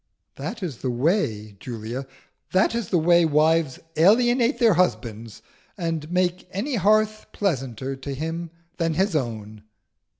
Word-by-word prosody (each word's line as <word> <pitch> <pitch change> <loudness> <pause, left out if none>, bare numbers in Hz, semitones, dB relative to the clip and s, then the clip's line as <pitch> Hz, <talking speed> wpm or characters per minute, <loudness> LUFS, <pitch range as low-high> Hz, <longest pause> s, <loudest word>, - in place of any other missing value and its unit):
"That 225 -3 -6
is 155 -9 -4
the 130 - -3
way, 120 - 0
Julia 120 +3 -6 0.5
that 190 +4 +3
is 230 -5 -2
the 180 - +2
way 170 +1 +5
wives 155 -2 +2 0.2
alienate 240 - +4
their 230 -4 +5
husbands, 115 - -1 0.3
and 165 -3 -3
make 180 0 0
any 230 +10 -3
hearth 215 +1 +2
pleasanter 135 - -2
to 135 +1 -6
him 165 +4 -4 0.3
than 165 -2 0
his 190 0 +1
own!" 110 -6 -3
165 Hz, 135 wpm, -24 LUFS, 130-195 Hz, 0.5 s, way